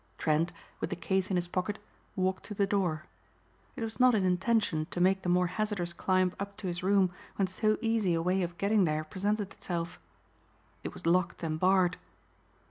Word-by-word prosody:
Trent, 160 +2 +1 0.3
with - - -2
the - - -2
case 190 +3 0
in 190 - 0
his 175 -1 0
pocket, 185 +4 -2 0.4
walked 185 0 0
to 210 - -6
the 200 - +2
door. 180 -6 0 0.7
It 230 - -4
was 225 +2 -5
not 250 -2 +6
his 200 - +2
intention 185 -3 +1
to - - -4
make 190 +2 +3
the 180 - -2
more 180 +1 +4
hazardous 185 -2 -2
climb 185 0 +1
up 200 +1 -5
to 215 - -8
his 175 0 -2
room 190 -1 +3 0.2
when 195 - +2
so 215 +3 +1
easy 225 -6 +2
a 165 - 0
way 185 +2 +2
of 175 -1 -3
getting 200 -1 +3
there 155 -1 0
presented 200 +4 -2
itself. 170 -1 -4 0.8
It - - -4
was - - -9
locked 175 +1 +1
and 155 -1 -2
barred. 185 -1 +3
185 Hz, 195 wpm, -30 LUFS, 175-200 Hz, 0.8 s, not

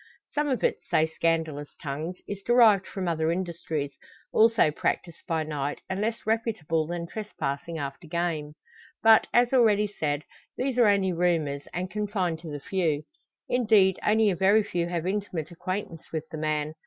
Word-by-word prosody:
Some 295 -1 0
of 260 - -1
it, - - +2
say 155 - +2
scandalous 160 -2 -1
tongues, 155 +4 -5
is 200 -1 -5
derived 220 -4 +5
from 190 -2 -4
other 160 -1 +1
industries, 165 -5 -3 0.4
also 225 -8 +5
practised 170 +2 -2
by 160 -1 0
night, 145 -2 -3
and 190 +1 -3
less 225 +1 -2
reputable 215 -9 0
than 170 0 -3
trespassing 170 -6 -4
after 140 +3 -6
game. 155 -3 -2 0.5
But, 225 0 +7
as 240 +1 +3
already 215 -5 +5
said, 150 -8 -2 0.3
these 265 -1 -1
are 235 - +6
only 195 -2 +3
rumours, 165 -5 0
and 180 +1 -4
confined 200 -6 -1
to 165 -1 -9
the 145 -1 -5
few. 155 -2 -1 0.4
Indeed, 210 -6 +4
only 215 -1 +4
a - - -1
very 200 +4 +4
few 170 -3 -2
have 175 -1 -2
intimate 185 -5 -3
acquaintance 175 -1 -5
with 160 -1 -4
the 160 - -5
man. 155 0 -1
175 Hz, 165 wpm, -27 LUFS, 155-210 Hz, 0.5 s, But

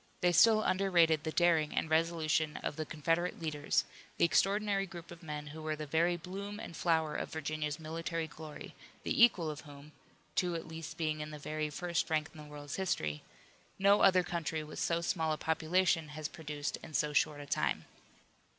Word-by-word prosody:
They 180 - +4
still 215 +5 +6
underrated 175 -5 +3
the 160 - -1
daring 165 -3 +3
and - - +1
resolution 160 -1 +1
of - - -2
the 155 0 -4
Confederate 165 +3 0
leaders, 150 -3 0 0.3
the - - +5
extraordinary 195 +2 +2
group 170 -2 -10
of 175 - -11
men 150 -2 -5
who 160 - -8
were 155 0 -2
the 155 0 -5
very 170 +4 +2
bloom 200 +4 -6
and 170 - -7
flower 160 -3 +1
of - - -3
Virginia's 155 -1 -3
military 165 +1 -3
glory, 155 +1 -9 0.3
the - - +4
equal 175 -9 +4
of 150 - -8
whom 145 0 -13 0.4
two 175 0 +1
at 165 - -5
least 160 -1 -7
being 155 -2 -1
in 150 - -5
the 150 - -7
very 155 +1 -3
first 170 +3 -1
rank 155 -1 0
in 155 - -12
the 150 - -13
world's 145 -1 -6
history 80 - -1 0.6
no 200 +1 +5
other 185 -2 +6
country 165 -2 -2
with 150 - -8
so 170 0 +1
small 160 -2 0
a - - -3
population 160 +1 +1
has 150 0 -5
produced 150 -2 -4
in 155 - -9
so 150 0 +1
short 150 0 +2
a 145 - -7
time. - - 0
160 Hz, 190 wpm, -33 LUFS, 150-175 Hz, 0.6 s, still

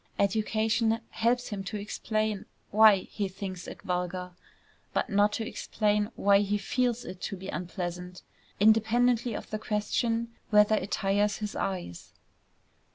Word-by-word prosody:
Education 220 +2 +1
helps 240 +2 +1
him 200 -3 -4
to 210 - -4
explain 215 0 -2 0.2
why 215 0 +8 0.2
he 205 -2 -2
thinks 190 -1 -7
it - - -9
vulgar, 180 0 -2 0.6
but - - -1
not 205 +1 +4
to 225 0 -2
explain 210 -1 0
why 200 0 +4
he 205 0 +1
feels 245 +3 -1
it 185 - -8
to 195 - -4
be 190 +1 -8
unpleasant, 180 0 -5 0.4
independently 225 +2 +3
of - - -7
the 215 - -2
question 230 +2 -1 0.2
whether 210 0 +5
it 205 -2 0
tires 205 +1 +1
his 210 -1 -5
eyes. 90 - -4
210 Hz, 140 wpm, -29 LUFS, 190-220 Hz, 0.6 s, why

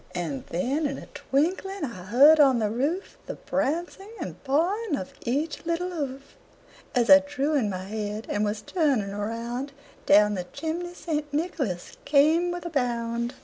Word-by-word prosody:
And 160 -7 -4
then 275 - 0
in 275 - -4
a - - -9
twinkling 365 +7 -1
I 185 -9 -8
heard 280 +10 +7
on 270 -4 +6
the 215 -2 0
roof 290 - -2
The - - -4
prancing 345 +6 -2
and 315 - -7
pawing 340 +7 +1
of 185 - -6
each 290 +6 -1
little 340 +2 -1
hoof, 275 -5 -6 0.6
As 240 -2 +3
I 285 0 +10
drew 285 +1 -2
in 255 -8 +2
my 185 -1 -4
head 210 +2 -4
and 205 - -1
was 210 0 -2
turning 275 - +1
around, 235 +6 -4 0.3
Down 210 +1 +6
the 180 -3 -3
chimney 335 - -5
St. 300 -4 -3
Nicholas 285 - -3
came 315 +5 +4
with 350 0 -5
a 345 - -4
bound. 235 -2 -1
275 Hz, 165 wpm, -26 LUFS, 220-320 Hz, 0.6 s, I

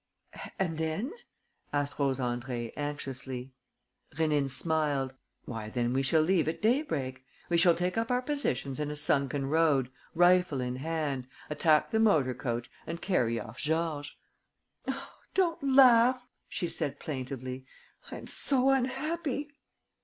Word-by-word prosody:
"And 165 -4 -1
then?" 160 - -2 0.6
asked 145 0 -1
Rose 135 -2 +2
Andrée, 120 -2 -3
anxiously. 135 -3 -5 0.6
Rénine 150 -3 +1
smiled: 145 -2 +1 0.3
"Why, 110 -3 -5
then 120 +1 0
we 135 - +2
shall 155 +4 +3
leave 170 -1 +2
at 160 - -2
daybreak. 155 - 0 0.3
We 170 - +3
shall 170 0 +6
take 180 +5 0
up 230 - -1
our 250 0 +1
positions 145 - -2
in 150 -1 -1
a 150 - -4
sunken 140 -2 0
road, 145 -4 +2 0.2
rifle 175 -4 +4
in 125 0 -2
hand, 145 -3 -2 0.2
attack 150 +3 +3
the 220 - +2
motor 160 -13 +4
coach 120 -1 -3 0.2
and 170 +1 -4
carry 120 - +1
off 110 +3 -9
Georges!" 155 -2 -1 0.7
"Oh, - - -4 0.2
don't 350 -4 +2
laugh!" 255 -2 +6 0.2
she - - -2
said, 150 -4 -2
plaintively. 130 -2 -5 0.4
"I - - -5
am - - -9
so 270 -1 +2
unhappy!" 285 +2 -1
150 Hz, 140 wpm, -30 LUFS, 130-185 Hz, 0.7 s, shall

